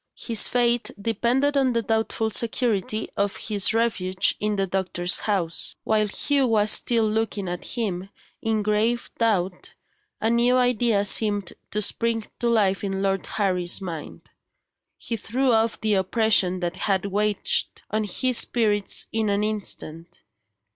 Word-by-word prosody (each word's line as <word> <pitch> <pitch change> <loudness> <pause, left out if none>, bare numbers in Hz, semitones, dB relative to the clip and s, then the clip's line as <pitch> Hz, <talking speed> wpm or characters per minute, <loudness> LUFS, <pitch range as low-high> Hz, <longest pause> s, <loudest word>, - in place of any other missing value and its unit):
His 225 -3 +3
fate 240 -1 +1
depended 240 +7 0
on 265 -3 +2
the 230 -1 0
doubtful 220 0 -1
security 220 -3 0
of 200 0 -1
his 205 -3 +2
refuge 200 -5 +1
in 210 0 -1
the 195 -1 0
doctor's 180 -1 0
house. 180 -6 -1
While 215 -1 +1
Hugh 275 +6 +1
was 215 -2 +3
still 230 -2 +2
looking 215 -2 -2
at 175 0 -5
him, 195 -5 -3 0.3
in 220 -1 -1
grave 215 +3 0
doubt, 190 -5 -1 0.4
a 220 - -1
new 240 +2 +3
idea 240 -4 +2
seemed 205 -2 +1 0.2
to 210 0 0
spring 225 +1 -1
to 240 - 0
life 205 -4 +1
in 195 -1 -2
Lord 195 -1 -1
Harry's 180 -4 0
mind. 170 -6 -7 0.8
He 230 - -4
threw 255 +5 0
off 225 0 +1
the 215 -1 0
oppression 190 -2 +2
that 175 +1 -3
had 195 -2 0
weighed 205 +1 -1 0.4
on 215 0 0
his 250 +5 +1
spirits 210 -4 +2
in 220 -1 0
an 200 +1 0
instant. 180 -6 -4
215 Hz, 145 wpm, -24 LUFS, 195-230 Hz, 0.8 s, His